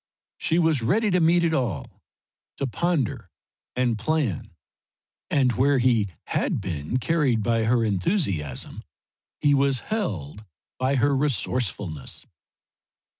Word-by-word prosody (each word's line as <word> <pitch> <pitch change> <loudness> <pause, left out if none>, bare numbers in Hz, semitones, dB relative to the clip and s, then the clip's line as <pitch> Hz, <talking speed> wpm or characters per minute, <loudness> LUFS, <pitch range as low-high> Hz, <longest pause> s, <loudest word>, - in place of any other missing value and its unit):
She 165 - +1
was 160 -6 +3
ready 210 - +2
to 180 - +3
meet 170 +1 +4
it 165 -1 +2
all, 115 - -2 0.6
to - - -1
ponder 150 - -1 0.5
and 120 -3 +1
plan. 130 - -1 0.7
And 135 -3 +3
where 135 +5 +3
he 120 -5 +3 0.2
had - - 0
been 80 - -3
carried 130 -6 +1
by 115 -1 +1
her 115 0 +3
enthusiasm 95 - -1 0.6
he 145 - +4
was 135 -2 +2
held 105 - -3 0.4
by 130 +2 +1
her 140 +2 +3
resourcefulness. 110 - -2
130 Hz, 120 wpm, -25 LUFS, 110-155 Hz, 0.7 s, meet